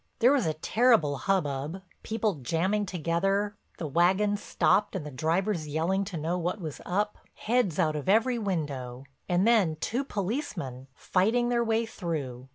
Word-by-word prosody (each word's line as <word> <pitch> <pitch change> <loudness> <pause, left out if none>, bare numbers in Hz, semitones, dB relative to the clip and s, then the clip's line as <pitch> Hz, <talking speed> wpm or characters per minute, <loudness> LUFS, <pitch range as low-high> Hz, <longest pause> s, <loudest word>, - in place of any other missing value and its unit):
There 245 +3 +5
was 270 - +2
a 155 - -1
terrible 215 - +3
hubbub, 150 +1 -1 0.2
people 215 -6 -1
jamming 190 - 0
together, 195 +4 0 0.2
the 165 - -4
wagons 190 +7 +2
stopped 205 0 +2
and 175 -6 -3
the 150 - -6
drivers 165 +5 0
yelling 170 +6 0
to 185 -4 -5
know 165 +4 -1
what 180 +4 -2
was 155 -5 -6
up, 205 +3 -1 0.2
heads 225 -8 0
out 155 -4 +2
of 150 +3 -3
every 230 +4 +3
window, 140 - -3 0.3
and 180 +4 +3
then 205 -9 +4
two 235 - -2
policemen, 190 - -4
fighting 225 - +1
their 240 -1 +2
way 225 0 +1
through. 145 - -5
185 Hz, 160 wpm, -28 LUFS, 155-210 Hz, 0.3 s, There